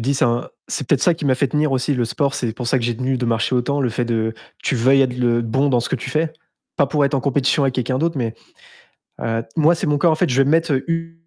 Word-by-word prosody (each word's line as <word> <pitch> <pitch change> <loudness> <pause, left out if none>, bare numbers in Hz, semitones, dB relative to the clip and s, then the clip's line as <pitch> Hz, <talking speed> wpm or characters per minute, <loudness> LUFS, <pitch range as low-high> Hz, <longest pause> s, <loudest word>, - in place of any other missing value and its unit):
dis: 135 +5 0
«C'est - - +2
un 120 0 0 0.2
c'est 140 - -3
peut-être 135 -1 +1
ça 175 - +4
qui 165 -2 -5
m'a 130 - +3
fait 140 +1 0
tenir 150 +1 0
aussi, 130 +2 0
le 125 -2 0
sport». 140 +4 -1
C'est 120 -3 -2
pour 125 - -5
ça 130 +2 +2
que 115 - -4
j'ai 120 -1 -1
tenu 130 +1 -1
de 125 - -2
marcher 115 0 0
autant, 140 +4 0
le 125 -3 0
fait 120 +2 -1
de 110 -1 -1 0.3
tu - - 0
veuilles 135 +4 +4
être 125 -2 -1
le 120 -1 +2
bon 130 +5 +1
dans 125 -3 +2
ce - - -4
que 135 - -1
tu 125 - -7
fais, 160 +1 -1 0.4
pas 140 - +3
pour 145 +1 +1
être 140 +1 0
en 135 - +1
compétition 140 +1 +1
avec 135 -2 0
quelqu'un 130 +1 -1
d'autre 165 +2 0
mais 115 -4 -2 0.9
heu, 115 0 -1
moi, 160 +2 +4
c'est 165 - -3
mon 145 -1 +2
corps, 165 +2 +3
en - - +3
fait, 155 0 0
je 130 +2 +2
vais 135 - +1
mettre 165 +1 +2
u 165 0 -3
130 Hz, 295 wpm, -20 LUFS, 120-145 Hz, 0.9 s, ça